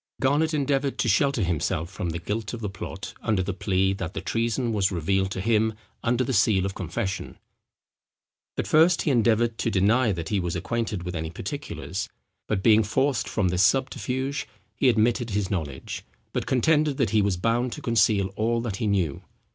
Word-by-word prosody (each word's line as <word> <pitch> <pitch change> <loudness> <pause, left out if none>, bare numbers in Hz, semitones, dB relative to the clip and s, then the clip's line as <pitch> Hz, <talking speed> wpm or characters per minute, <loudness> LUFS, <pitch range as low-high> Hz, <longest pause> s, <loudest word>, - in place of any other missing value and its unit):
Garnet 145 +4 +2
endeavoured 140 -2 0
to - - 0
shelter 135 +1 +2
himself 85 0 -1
from 95 -3 -3
the 85 - -3
guilt 105 +6 -3
of 115 - -9
the 105 -3 -3
plot, 100 - -7
under 105 -4 +1
the 100 +1 -2
plea, 95 0 +1
that 95 -3 -5
the - - -1
treason 115 +1 -1
was 100 -2 +2
revealed 95 +3 0
to 95 - -4
him 110 +1 +2 0.3
under 120 +2 +2
the 130 - -2
seal 100 -6 +3
of 95 - -2
confession. 95 +2 -4 1.2
At - - -1
first 165 +3 +4
he 150 - +2
endeavoured 115 -1 +2
to - - +1
deny 110 +4 +3
that 85 -3 -4
he 105 - +1
was 90 -2 -2
acquainted 105 +1 -2
with 90 0 -5
any 80 0 -3
particulars; 95 - -5 0.4
but 95 -3 -1
being 110 -1 +6
forced 130 +5 0
from 100 -4 +1
this 90 +1 +1
subterfuge, 130 +4 0 0.3
he 130 - +3
admitted 120 +1 +2
his 100 -2 -1
knowledge, 75 -8 -4 0.3
but - - -2
contended 150 +2 +2
that 115 -7 +1
he 110 -1 +4
was 100 -3 +1
bound 115 +6 0
to 150 - -7
conceal 105 -4 +3
all 115 +2 +1
that 110 -5 -3
he 110 - -1
knew. 90 -8 0
110 Hz, 185 wpm, -25 LUFS, 95-125 Hz, 1.2 s, being